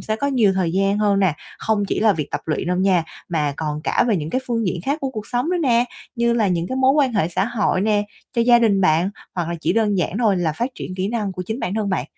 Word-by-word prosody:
sẽ 215 0 -2
có 280 - -1
nhiều 235 -8 +3
thời 180 -3 0
gian 195 +2 +1
hơn 205 -2 +2
nè, 180 -6 +2 0.2
không 210 -2 0
chỉ - - -1
là 215 -1 +5
việc 155 -4 -4
tập - - -2
luyện 160 +2 -1
đâu 180 0 0
nha, 185 -3 +2 0.2
mà 150 -4 0
còn 150 -1 -3
cả - - +2
về 210 - +3
những 155 0 -4
cái 255 - 0
phương 230 -4 -1
diện 175 -1 -2
khác 285 +3 0
của 270 -1 -2
cuộc 215 -4 -6
sống 245 +7 -1
nữa 360 - +1
nè, 240 -3 +3 0.3
như 235 -1 +1
là 225 -4 +2
những 170 -1 0
cái 260 - -3
mối 265 0 +4
quan 275 -4 +2
hệ 185 -6 +1
xã 175 - 0
hội 215 -5 0
nè, 205 0 +2 0.3
cho 235 - +2
gia 240 0 +6
đình 210 -4 +3
bạn, 180 +1 +3 0.2
hoặc 175 -2 -2
là 170 - -2
chỉ - - +1
đơn 210 -4 +1
giản 180 +3 -1
thôi 215 -5 +3
là 170 -4 0
phát 240 +10 -2
triển 185 - -6
kỹ 190 +1 -2
năng 215 -4 -2
của 180 0 -5
chính 220 +5 -4
bản 185 - -2
thân 215 -2 -1
bạn. 185 -9 -1
205 Hz, 290 wpm, -21 LUFS, 180-235 Hz, 0.3 s, gia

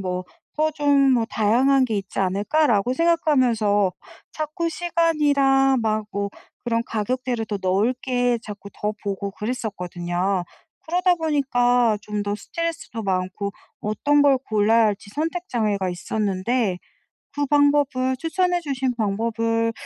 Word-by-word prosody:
뭐 185 -1 -3 0.3
더 310 +1 +2
좀 285 -2 +3
뭐 235 -2 +2
다양한 255 +6 +3
게 225 -4 -1
있지 195 0 -7
않을까?' 205 +12 +1
라고 235 +1 +2
생각하면서 250 - +2 0.4
자꾸 310 +2 -3
시간이랑 290 -6 +2
막 215 -1 0
뭐 200 0 -2 0.3
그런 230 -1 0
가격대를 240 +2 -2
더 205 -2 -3
넓게 245 +5 +1
자꾸 205 -2 -9
더 210 0 -3
보고 200 0 -3
그랬거든요. 190 -5 -2 0.4
그러다 360 +2 +2
보니까 245 -7 +2
좀 210 0 -3
더 205 0 -2
스트레스도 335 -6 -5
많고 190 +1 -2 0.3
어떤 285 +7 +2
걸 280 -2 +4
골라야 220 +1 +4
할지 205 -1 -3
선택 330 +4 -3
장애가 210 -5 0
있었는데 195 +3 -1 0.6
그 290 0 0
방법을 285 -3 +2
추천해 355 +4 0
주신 265 -5 -2
방법을 230 +1 0
235 Hz, 275 characters per minute, -23 LUFS, 205-285 Hz, 0.6 s, 걸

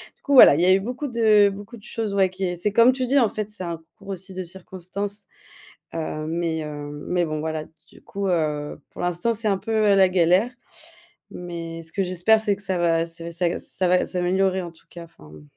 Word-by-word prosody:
du - - -43
coup, 285 - -1
voilà, 250 - +9
il 165 - 0
y - - +4
a 185 - +6
eu 195 - +4
beaucoup 250 +7 -4
de 220 -4 +4
beaucoup 205 +4 -9
de 210 - -18
choses, 225 -3 -3
ouais, 195 -2 +3
qui 185 +1 -7
est 180 -1 -2
c'est 205 +4 0
comme 235 +3 +6
tu 255 0 -2
dis, 275 +3 +3
en 230 -5 +3
fait, 215 -1 -4
c'est 205 -3 -4
un 170 -1 -4
concours 165 +5 -18
aussi 190 0 -5
de 185 0 -4
circonstances, 190 +3 -6 0.7
heu, 155 -1 -4
mais 165 0 -1
hem, 145 -1 -7
mais 180 -1 +1
bon, 155 -1 -3
voilà, 155 0 -3 0.3
du - - -18
coup, 200 0 -4
heu, 150 -4 -1
pour - - -8
l'instant, 175 +6 0
c'est 220 0 0
un 200 -2 +2
peu, 220 +4 -6 0.2
heu, - - +5
la 190 -1 +5
galère, 180 +6 +3 0.8
mais 170 -2 -7
ce 165 - -9
que 195 - -1
j'espère 185 +5 +3
c'est 210 -2 +1
que 205 - -10
ça 190 -2 -1
va 165 -1 +2
ça 165 0 -8
va 170 - -6
s'aggr 170 0 -1
ça 185 -1 -1
va 180 0 +3
s'améliorer, 185 +1 0
en 175 - -7
tout 165 - -22
cas, 170 - -10
enfin, 75 - -18
bon. 75 -1 -14
185 Hz, 245 wpm, -23 LUFS, 165-205 Hz, 0.8 s, voilà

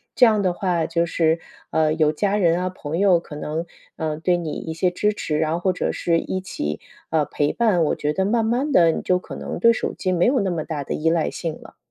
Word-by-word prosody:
这 250 - +7
样 215 -3 +3
的 185 -2 +2
话， 175 -2 0
就 170 0 0
是， 165 -1 +1 0.3
呃， 155 -1 +2
有 155 -1 +2
家 200 +6 0
人 175 -4 +3
啊、 185 - -1
朋 165 -4 -5
友 185 -3 +4
可 150 -3 -9
能， 155 +3 -3 0.3
呃， 155 -1 -3
对 175 +3 +1
你 170 -3 -3
一 160 +2 -5
些 180 +3 +1
支 210 +4 0
持。 155 -7 -2
然 160 0 +1
后 170 - -1
或 185 +1 +1
者 180 - -2
是 170 -1 +1
一 185 - -3
起， 75 - -4 0.3
呃， 160 -2 +2
陪 145 0 -1
伴， 205 -8 +2
我 - - +1
觉 150 - -1
得 190 +5 0
慢 225 +3 +2
慢 255 +6 0
地 170 -6 +6
你 - - -3
就 180 - +2
可 180 - -8
能 - - -5
对 230 - +6
手 230 - -2
机 185 - -2
没 180 -1 +2
有 260 -1 +3
那 195 -2 0
么 160 -3 -3
大 150 -4 -4
的 - - -4
依 160 +1 +1
赖 165 -1 +1
性 165 -3 -4
了。 - - -14
170 Hz, 275 characters per minute, -22 LUFS, 160-190 Hz, 0.3 s, 这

